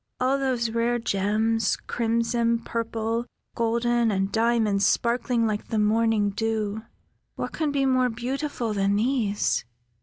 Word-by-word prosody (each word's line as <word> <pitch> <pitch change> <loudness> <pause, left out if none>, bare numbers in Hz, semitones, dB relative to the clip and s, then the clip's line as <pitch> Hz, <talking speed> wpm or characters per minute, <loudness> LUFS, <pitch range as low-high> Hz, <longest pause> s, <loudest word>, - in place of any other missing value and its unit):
"All 260 +2 +2
those 250 -4 0
rare 235 +1 +1
gems, 220 +1 0
crimson, 230 0 0
purple, 230 +1 -2 0.3
golden, 235 0 +1
and 195 -1 0
diamonds 225 -3 +2
sparkling 235 +2 +1
like 215 -1 -2
the 225 - -2
morning 215 -1 +2
dew. 220 0 -2 0.5
What - - -4
can 310 -3 -1
be 275 -1 +1
more 255 -1 +3
beautiful 245 0 -3
than 200 0 +1
these?" 220 -2 +1
230 Hz, 125 wpm, -25 LUFS, 215-240 Hz, 0.5 s, more